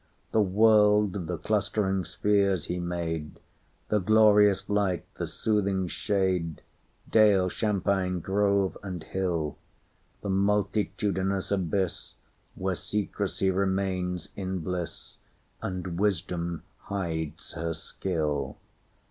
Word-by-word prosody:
The 110 Hz, -, +4 dB
world—the 105 Hz, -3 st, +4 dB
clustering 95 Hz, -1 st, 0 dB
spheres 100 Hz, -4 st, +1 dB
He 90 Hz, -, -3 dB
made, 85 Hz, -3 st, -3 dB, 0.5 s
The 105 Hz, -, +3 dB
glorious 105 Hz, -1 st, +5 dB
light, 100 Hz, -3 st, 0 dB
the -, -, -1 dB
soothing 100 Hz, -4 st, 0 dB
shade, 90 Hz, -2 st, -1 dB, 0.5 s
Dale, 100 Hz, -4 st, +5 dB
champaign, 95 Hz, -3 st, 0 dB
grove, 100 Hz, +1 st, +1 dB
and 90 Hz, -4 st, -6 dB
hill; 85 Hz, -5 st, -2 dB, 0.6 s
The 100 Hz, -, -4 dB
multitudinous 100 Hz, -1 st, 0 dB
abyss, 95 Hz, -1 st, -1 dB, 0.4 s
Where 95 Hz, 0 st, -1 dB
Secrecy 100 Hz, 0 st, -1 dB
remains 95 Hz, -2 st, -1 dB
in 95 Hz, -2 st, -3 dB
bliss, 90 Hz, +1 st, -5 dB, 0.4 s
And 90 Hz, -2 st, -4 dB
Wisdom 85 Hz, -4 st, -1 dB, 0.2 s
hides 80 Hz, -6 st, -4 dB
her 80 Hz, -1 st, -3 dB
skill. 80 Hz, -2 st, -2 dB
95 Hz, 95 wpm, -28 LUFS, 90-100 Hz, 0.6 s, glorious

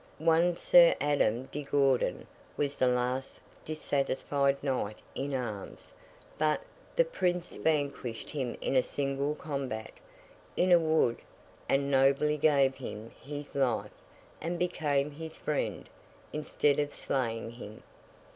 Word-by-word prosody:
One 165 Hz, +2 st, +3 dB
Sir 175 Hz, -1 st, +7 dB
Adam 130 Hz, -4 st, +1 dB
de 150 Hz, -, -3 dB
Gourdon 140 Hz, -2 st, +1 dB, 0.3 s
was 145 Hz, -1 st, 0 dB
the 130 Hz, -, +2 dB
last 125 Hz, +1 st, -1 dB, 0.2 s
dissatisfied 140 Hz, -2 st, 0 dB
knight 125 Hz, -7 st, -1 dB, 0.2 s
in 140 Hz, +1 st, -3 dB
arms; 110 Hz, -6 st, -6 dB, 0.5 s
but, 155 Hz, 0 st, +2 dB, 0.3 s
the -, -, +4 dB
Prince 180 Hz, -, -1 dB
vanquished 140 Hz, -6 st, -1 dB
him 130 Hz, -6 st, -3 dB
in 130 Hz, -1 st, +3 dB
single 140 Hz, +2 st, -2 dB
combat, 135 Hz, -8 st, -4 dB, 0.7 s
in 180 Hz, +1 st, +3 dB
a 175 Hz, -, +8 dB
wood, 155 Hz, -7 st, +2 dB, 0.5 s
and 140 Hz, +1 st, +2 dB
nobly 140 Hz, +3 st, +3 dB
gave 140 Hz, -3 st, +4 dB
him 115 Hz, -4 st, -8 dB
his 145 Hz, +1 st, -7 dB
life, 130 Hz, -4 st, 0 dB, 0.5 s
and 170 Hz, +2 st, -2 dB
became 150 Hz, -5 st, 0 dB
his 160 Hz, +2 st, -8 dB
friend, 150 Hz, -, -2 dB, 0.5 s
instead 150 Hz, -1 st, +1 dB
of 145 Hz, 0 st, -2 dB
slaying 115 Hz, -4 st, -2 dB
him. 110 Hz, -2 st, -10 dB
140 Hz, 120 wpm, -30 LUFS, 130-150 Hz, 0.7 s, a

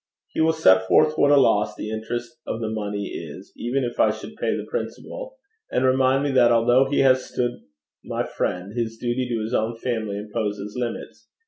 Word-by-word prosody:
'He -, -, -2 dB
will 160 Hz, 0 st, +4 dB
set 95 Hz, -12 st, +4 dB
forth 155 Hz, +9 st, +4 dB
what 145 Hz, -, +4 dB
a 145 Hz, -, +6 dB
loss 105 Hz, -6 st, +3 dB
the 105 Hz, -, -5 dB
interest 120 Hz, +2 st, -5 dB
of 115 Hz, -, -3 dB
the 110 Hz, -1 st, -3 dB
money 105 Hz, -2 st, -3 dB
is, 85 Hz, +3 st, -8 dB
even 130 Hz, +3 st, -1 dB
if 120 Hz, -1 st, -4 dB
I 110 Hz, -, +5 dB
should 110 Hz, -, -6 dB
pay -, -, -1 dB
the -, -, -5 dB
principal; -, -, -6 dB, 0.4 s
and 130 Hz, -, +1 dB
remind 130 Hz, +1 st, +3 dB
me 145 Hz, -, 0 dB
that 125 Hz, -3 st, +5 dB
although 120 Hz, +3 st, +4 dB
he 145 Hz, -, +2 dB
has 130 Hz, -1 st, +4 dB
stood 120 Hz, -1 st, -2 dB, 0.4 s
my -, -, -2 dB
friend, 90 Hz, +3 st, -3 dB
his 115 Hz, -1 st, -3 dB
duty 120 Hz, +2 st, -1 dB
to 115 Hz, -2 st, -1 dB
his 110 Hz, +3 st, -4 dB
own 115 Hz, 0 st, 0 dB
family 110 Hz, -4 st, -2 dB
imposes 105 Hz, -1 st, -4 dB
limits. 120 Hz, -2 st, -5 dB
120 Hz, 200 wpm, -23 LUFS, 110-130 Hz, 0.4 s, a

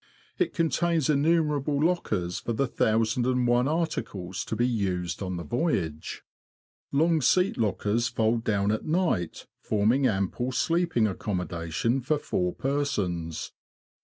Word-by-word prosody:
It 365 Hz, -, 0 dB
contains 165 Hz, -1 st, +1 dB
innumerable 150 Hz, -1 st, +2 dB
lockers 105 Hz, -, 0 dB
for 120 Hz, -, -3 dB
the 140 Hz, +5 st, +1 dB
thousand 115 Hz, 0 st, +1 dB
and 125 Hz, -1 st, +2 dB
one 120 Hz, +2 st, +3 dB
articles 115 Hz, -, -2 dB
to -, -, -3 dB
be 120 Hz, +2 st, +2 dB
used 90 Hz, -7 st, -2 dB
on 95 Hz, -2 st, -3 dB
the 85 Hz, -, -5 dB
voyage. 85 Hz, -, -2 dB, 0.7 s
Long 160 Hz, +2 st, +3 dB
seat 180 Hz, +9 st, +3 dB
lockers 110 Hz, +1 st, 0 dB
fold 115 Hz, 0 st, 0 dB
down 100 Hz, -2 st, +1 dB
at 110 Hz, -, -1 dB
night, 155 Hz, -, 0 dB
forming 115 Hz, +6 st, +2 dB
ample 110 Hz, +5 st, -1 dB
sleeping 165 Hz, -7 st, +2 dB
accommodation 90 Hz, +3 st, -1 dB
for 150 Hz, +5 st, +1 dB
four 90 Hz, -10 st, -1 dB
persons. 95 Hz, -, -2 dB
120 Hz, 130 wpm, -27 LUFS, 95-150 Hz, 0.7 s, one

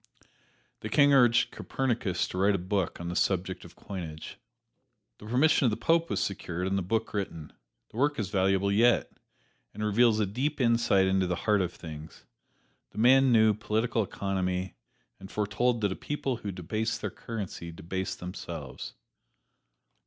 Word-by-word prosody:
The 110 Hz, -, -6 dB
King 145 Hz, +4 st, +5 dB
urged 120 Hz, -3 st, +4 dB
Copernicus 120 Hz, -9 st, -1 dB
to 90 Hz, -, -4 dB
write 100 Hz, +1 st, +3 dB
a -, -, +1 dB
book 95 Hz, 0 st, -2 dB
on 85 Hz, 0 st, -5 dB
the 90 Hz, -, -4 dB
subject 95 Hz, 0 st, 0 dB
of -, -, -14 dB
coinage. 80 Hz, -5 st, -8 dB, 0.8 s
The 105 Hz, -, -11 dB
permission 135 Hz, +5 st, +3 dB
of -, -, +5 dB
the 105 Hz, -, -2 dB
Pope 165 Hz, +8 st, +2 dB
was -, -, -1 dB
secured, 90 Hz, -2 st, -3 dB
and 95 Hz, +1 st, 0 dB
the 100 Hz, -, +1 dB
book 110 Hz, +5 st, -2 dB
written. 90 Hz, -7 st, -4 dB, 0.4 s
The -, -, -11 dB
work 145 Hz, +3 st, +2 dB
is 100 Hz, -3 st, -3 dB
valuable 95 Hz, 0 st, +2 dB
yet, 115 Hz, +4 st, +3 dB, 0.6 s
and 105 Hz, +1 st, -3 dB
reveals 110 Hz, +1 st, +3 dB
a 105 Hz, -, +2 dB
deep 130 Hz, +10 st, -2 dB
insight 115 Hz, -5 st, +3 dB
into 95 Hz, -1 st, +2 dB
the 90 Hz, -, 0 dB
heart 105 Hz, -2 st, +3 dB
of 90 Hz, -2 st, -1 dB
things. 80 Hz, -1 st, -10 dB, 0.6 s
The -, -, -17 dB
man 130 Hz, +3 st, +5 dB
knew 110 Hz, -2 st, +5 dB
political 110 Hz, +2 st, -1 dB
economy, 95 Hz, -2 st, -2 dB, 0.5 s
and 95 Hz, 0 st, -10 dB
foretold 110 Hz, +4 st, 0 dB
that 100 Hz, -2 st, +1 dB
a -, -, -2 dB
people 135 Hz, -4 st, -3 dB
who 105 Hz, -3 st, -5 dB
debased 110 Hz, +6 st, -3 dB
their -, -, -3 dB
currency 100 Hz, -6 st, -6 dB
debased 90 Hz, +3 st, -4 dB
themselves. 90 Hz, 0 st, -7 dB
105 Hz, 165 wpm, -28 LUFS, 95-115 Hz, 0.8 s, King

